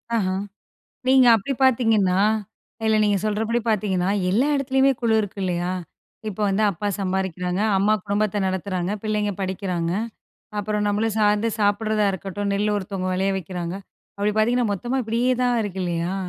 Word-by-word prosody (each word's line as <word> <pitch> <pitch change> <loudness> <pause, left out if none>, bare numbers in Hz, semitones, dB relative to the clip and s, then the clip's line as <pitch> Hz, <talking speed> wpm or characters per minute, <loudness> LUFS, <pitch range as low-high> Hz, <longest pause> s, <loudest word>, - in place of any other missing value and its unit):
அஹா! 190 -4 0 0.7
நீங்க 260 -1 +6
அப்படி 220 +6 -1
பார்த்தீங்கன்னா, 220 -7 +3 0.6
இல்ல 220 0 +3
நீங்க 205 -1 +2
சொல்றபடி 220 +2 0
பார்த்தீங்கன்னா, 190 -4 +1 0.2
எல்லா 230 +9 +2
இடத்துலயுமே 270 0 +2
குழு 230 -2 +2
இருக்கு 205 -1 -6
இல்லையா? 175 0 -1 0.6
இப்ப 210 0 -6
வந்து 195 +2 +1
அப்பா 195 +3 -5
சம்பாதிக்கிறாங்க, 185 -1 -2 0.2
அம்மா 210 +2 +3
குடும்பத்த 205 0 0
நடத்துறாங்க, 185 0 -2
பிள்ளைங்க 210 -1 0
படிக்கிறாங்க. 185 -3 -2 0.7
அப்புறம் 210 0 -1
நம்மள 210 +2 +1
சார்ந்து 210 +1 +3
சாப்பிடறதா 210 +1 +2
இருக்கட்டும். 195 +2 -4
நெல்லு 210 +1 +1
ஒருத்தவங்க 190 -2 -3
வெளைய 190 +1 +1
வைக்கிறாங்க, 175 -1 -5 0.4
அப்டி 205 +1 +1
பார்த்தீங்கன்னா, 235 0 +2
மொத்தமா 240 +7 -2
இப்டியே 235 +3 +1
தான் 245 -1 +2
இருக்கு 190 -2 -4
இல்லையா? 170 +1 -2
205 Hz, 140 wpm, -23 LUFS, 190-220 Hz, 0.7 s, நீங்க